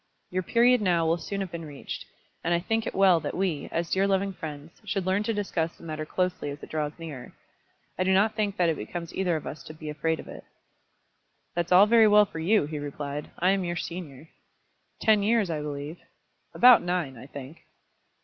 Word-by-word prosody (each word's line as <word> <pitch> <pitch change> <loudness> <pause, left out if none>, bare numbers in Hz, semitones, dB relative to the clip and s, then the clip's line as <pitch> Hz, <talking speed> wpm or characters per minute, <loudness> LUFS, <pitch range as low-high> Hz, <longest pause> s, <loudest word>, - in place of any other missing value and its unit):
"Your 185 +1 0
period 240 +5 +4
now 175 -4 +2
will 165 +2 +1
soon 200 +3 -4
have 190 -3 -4
been 170 -1 -6
reached, 145 -3 -7 0.4
and 170 +1 +2
I - - +1
think 225 +5 -1
it - - -4
well 190 -3 +5
that - - -4
we, 180 -6 -1
as 170 0 -2
dear 195 +1 +2
loving 195 0 +1
friends, 155 0 -9
should 195 -2 -2
learn 190 +2 +1
to 215 - -1
discuss 190 -6 -2
the - - -16
matter 155 -1 -5
closely 180 -4 -1
as 145 +1 -8
it - - -10
draws 150 -1 -2
nearer. 150 -7 -8 0.7
I - - +3
do 190 - +2
not 205 +3 +4
think 210 -2 -1
that 175 - +3
it 160 -2 +1
becomes 170 +10 -6
either 180 -3 0
of 155 - -4
us 150 - -6
to 155 - -9
be 155 -1 -6
afraid 160 +2 -1
of - - -9
it." - - -9 1.1
"That's 175 +1 -2
all 185 +3 +8
very 225 0 +6
well 210 0 +6
for 165 - -8
you," 190 +1 +3
he 150 0 -5
replied. 145 0 -5
"I 185 +2 +3
am 195 -1 +1
your 175 -1 -2
senior." 165 -5 -6 0.7
"Ten 215 -2 +4
years, 210 -3 +2
I 155 -2 -2
believe." 150 +2 -5 0.6
"About 250 -1 +8
nine, 175 -6 -2
I 125 +3 -11
think." 140 +2 -9
175 Hz, 215 wpm, -27 LUFS, 155-195 Hz, 1.1 s, all